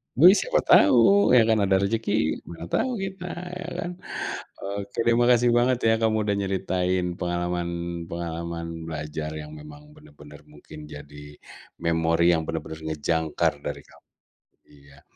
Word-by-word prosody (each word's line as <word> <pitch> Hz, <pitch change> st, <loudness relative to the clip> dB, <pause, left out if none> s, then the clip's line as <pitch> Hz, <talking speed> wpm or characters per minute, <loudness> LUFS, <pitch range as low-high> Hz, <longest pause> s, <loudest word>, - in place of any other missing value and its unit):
Wih 175 Hz, +7 st, +9 dB
siapa -, -, +1 dB
tahu, 130 Hz, +5 st, +6 dB
ya 115 Hz, -, +7 dB
kan 110 Hz, -1 st, +3 dB
ada 95 Hz, -, +3 dB
rejeki, 110 Hz, -5 st, 0 dB
mana 85 Hz, 0 st, -8 dB
tahu 255 Hz, -2 st, 0 dB
kita, 190 Hz, -2 st, -6 dB, 0.3 s
ya 170 Hz, -, -7 dB
kan. 175 Hz, -, -3 dB, 0.7 s
Oke 100 Hz, +2 st, -6 dB
deh, 115 Hz, 0 st, +4 dB
makasih 120 Hz, 0 st, +4 dB
banget 125 Hz, +1 st, +3 dB
ya 110 Hz, -, +5 dB
kamu 110 Hz, -1 st, +2 dB
udah 105 Hz, -1 st, +1 dB
nyeritain 95 Hz, -2 st, -1 dB
pengalaman 85 Hz, 0 st, -2 dB, 0.4 s
pengalaman 85 Hz, -1 st, -5 dB
belajar 75 Hz, 0 st, -5 dB
yang 75 Hz, 0 st, -10 dB
memang 75 Hz, 0 st, -13 dB
benar-benar 75 Hz, 0 st, -15 dB
mungkin 75 Hz, 0 st, -13 dB
jadi, 75 Hz, 0 st, -11 dB, 0.4 s
memori 85 Hz, 0 st, +1 dB
yang 80 Hz, -1 st, 0 dB
benar-benar 80 Hz, -1 st, -5 dB
ngejangkar 80 Hz, 0 st, 0 dB
dari -, -, -5 dB
kamu -, -, -22 dB, 0.6 s
iya. 70 Hz, -1 st, -19 dB
85 Hz, 140 wpm, -25 LUFS, 75-110 Hz, 0.7 s, Wih